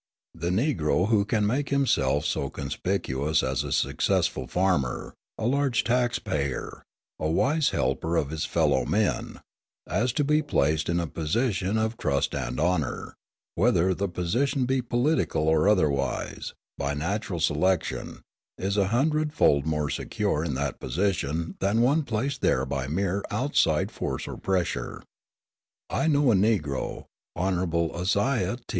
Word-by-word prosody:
The 85 +1 -3
Negro 95 - +1
who 105 -3 +3
can 105 -1 +1
make 135 +7 0
himself 75 - +2
so - - -1
conspicuous 75 -1 -1
as 65 -1 0
a - - -5
successful 65 - +1
farmer, 90 -9 0 0.2
a - - -3
large 135 -1 +2
tax 120 0 +1
payer, 70 -3 -3 0.4
a 80 - -1
wise 145 - +2
helper 70 +6 -1
of 70 -2 0
his 80 -1 -3
fellow 75 -7 +2
men, 105 - -1 0.5
as 120 +4 +1
to 145 - +1
be 150 +2 +3
placed 80 - +1
in 85 0 +1
a 85 - -1
position 95 - -1
of 110 +1 -1
trust 70 -2 0
and 65 -3 -3
honour, 80 -3 -1 0.4
whether 95 -3 +3
the 100 +2 -2
position 120 +10 0
be 130 +1 +1
political 120 - +1
or 80 +4 +4
otherwise, 70 -9 0 0.2
by 70 +1 -1
natural 95 +4 -2
selection, 85 +3 0 0.3
is 100 +2 -1
a 100 -2 +3
hundred 150 +7 +1
fold 70 +1 +3
more 75 -2 0
secure 75 - -1
in 75 -6 -2
that 70 0 -2
position 85 +1 -1
than 100 +4 +1
one 140 +7 +4
placed 130 +1 -2
there 65 - +2
by 65 0 -3
mere 95 +5 -1
outside 105 - +1
force - - -4
or - - -5
pressure. 90 -10 -2 0.9
I - - +1
know 145 -4 +4
a - - +4
Negro, 95 -9 0 0.3
Hon. 85 -2 0
Isaiah 100 +4 0
T. 125 - -24
95 Hz, 145 wpm, -26 LUFS, 75-115 Hz, 0.9 s, or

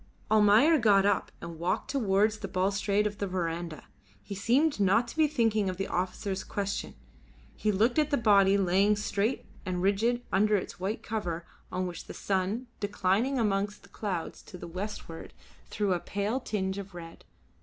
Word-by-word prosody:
Almayer 220 +9 +6
got 200 -4 +4
up 205 -1 +1
and 170 -1 -8
walked 175 +2 -1
towards 215 -4 +2
the 195 - -4
balustrade 200 +2 +1
of 205 -1 -3
the 200 - -1
verandah. 170 -3 -3 0.4
He - - -7
seemed 245 +8 +2
not 205 +5 +3
to - - -9
be 315 -1 +4
thinking 225 -8 +1
of 185 - -4
the 195 - -1
officer's 185 +2 -2
question. 200 0 -3 0.6
He 215 - 0
looked 225 +8 +2
at 300 -1 +2
the 285 - +2
body 200 -3 +5
laying 195 +2 +3
straight 210 +3 -1 0.2
and 185 -2 -2
rigid 230 +5 +1
under 210 +2 +3
its 190 - -3
white 195 +4 -3
cover 175 -6 -3 0.3
on 185 0 -1
which 175 -1 -6
the - - -9
sun, 195 +5 -1
declining 205 +6 +1
amongst 205 -2 0
the - - -17
clouds 185 -6 -4
to 180 - -11
the - - -8
westward, 185 -2 -7 0.3
threw 205 -3 0
a 175 - 0
pale 205 +8 -2
tinge 195 -5 -2
of 195 -2 -9
red. 165 -1 -10
200 Hz, 175 wpm, -29 LUFS, 185-215 Hz, 0.6 s, Almayer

